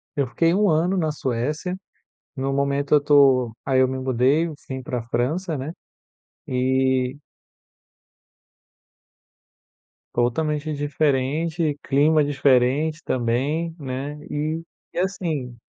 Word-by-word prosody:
Eu 140 -2 0
fiquei 165 +7 +2
1 205 +2 +3
ano 170 +4 +2
na 160 -3 +1
Suécia. 150 +6 -2 0.6
No 135 0 -2
momento, 140 +1 +1
eu - - +6
estou 140 -4 +4
aí 130 -1 +2
eu 130 - +4
me 130 +1 -3
mudei, 130 +4 +2
enfim, 140 -4 -7
para 125 -2 -4
França, 155 +8 -1
né, 140 +5 -5 0.8
e 130 0 +1 3.0
Totalmente 150 +5 0
diferente. 145 +2 0
Clima 150 +3 +3
diferente 145 +2 +2
também, 135 +7 -1
né, 140 +1 -5
e 155 +2 -2 0.3
e - - -2
assim 165 -10 -2
140 Hz, 105 wpm, -23 LUFS, 130-155 Hz, 3.0 s, eu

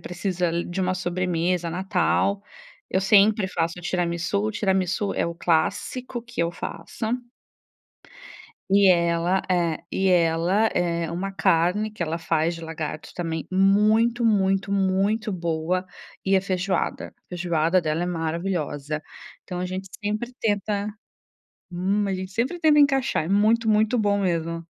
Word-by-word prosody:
precisa 180 -1 -2
li 170 +1 -1
de 175 +2 -4
uma 185 0 +1
sobremesa, 180 -1 -1
natal, 190 +2 0 0.5
eu 190 - +1
sempre 200 0 +4
faço 170 0 -2
tiramisu, 180 +4 -1
tiramisu 190 0 0
é - - 0
o 170 - -4
clássico 205 +10 -1
que 235 -4 -6
eu 170 0 0
faço 170 +5 -6 1.6
e 200 0 +6
ela 170 +1 +2
é. 170 -3 +1
E 190 0 +1
ela, 175 +4 +3
eh, 170 -2 -1
uma 190 +3 -3
carne 185 +4 +2
que 215 -4 -5
ela 165 0 -2
faz 165 0 0
de 165 - -9
lagarto 160 -2 -6
também 165 -2 -3
muito, 215 +5 +3
muito, 195 -2 +2
muito 200 +3 +1
boa, 170 +1 -1 0.4
e 195 0 +3
a - - +3
feijoada. 185 -1 -2
A - - -59
feijoada 175 0 +1
dela 160 0 -1
é - - -1
maravilhosa. 160 -3 -3 0.4
Então 180 -2 -6
a 180 - -2
gente 185 +1 -5
sempre 215 +4 -2
tenta 205 -1 0 0.8
hum, 195 +4 0
a 195 - -1
gente 185 0 -5
sempre 250 - -1
tenta 310 -2 +5
encaixar, 270 - +3
é - - -5
muito, 220 +4 +3
muito 220 +3 +3
bom 205 -2 +2
mesmo. 165 -2 -1
185 Hz, 145 wpm, -24 LUFS, 170-205 Hz, 1.6 s, e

